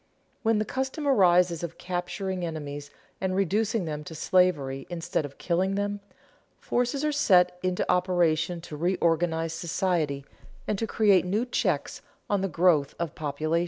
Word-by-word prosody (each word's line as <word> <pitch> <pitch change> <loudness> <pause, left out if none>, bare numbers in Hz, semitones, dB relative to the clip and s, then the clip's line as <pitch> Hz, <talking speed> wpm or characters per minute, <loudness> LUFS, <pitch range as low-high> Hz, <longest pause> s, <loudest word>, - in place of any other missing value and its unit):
When 225 -1 +2
the 215 - 0
custom 265 +5 -3
arises 180 - +4
of 170 -1 -6
capturing 180 +1 -3
enemies 145 -3 -5 0.3
and 190 -1 0
reducing 205 +2 +1
them 150 -1 -4
to 160 - -8
slavery 150 -7 +1
instead 165 -3 -2
of 140 - -10
killing 185 +2 0
them, 205 0 -1 0.6
forces 250 +4 -1
are 300 - +2
set 180 -10 +3
into 185 -1 0
operation 175 -2 +1
to 155 - -8
reorganize 165 -1 +1
society 165 -4 -1 0.4
and 205 - -1
to 225 - -1
create 205 -6 +4
new 205 +7 0
checks 185 - -1 0.3
on 200 -2 +2
the 195 - 0
growth 165 -4 +2
of 170 -3 -3
population. 155 +2 -1
180 Hz, 150 wpm, -27 LUFS, 160-195 Hz, 0.6 s, arises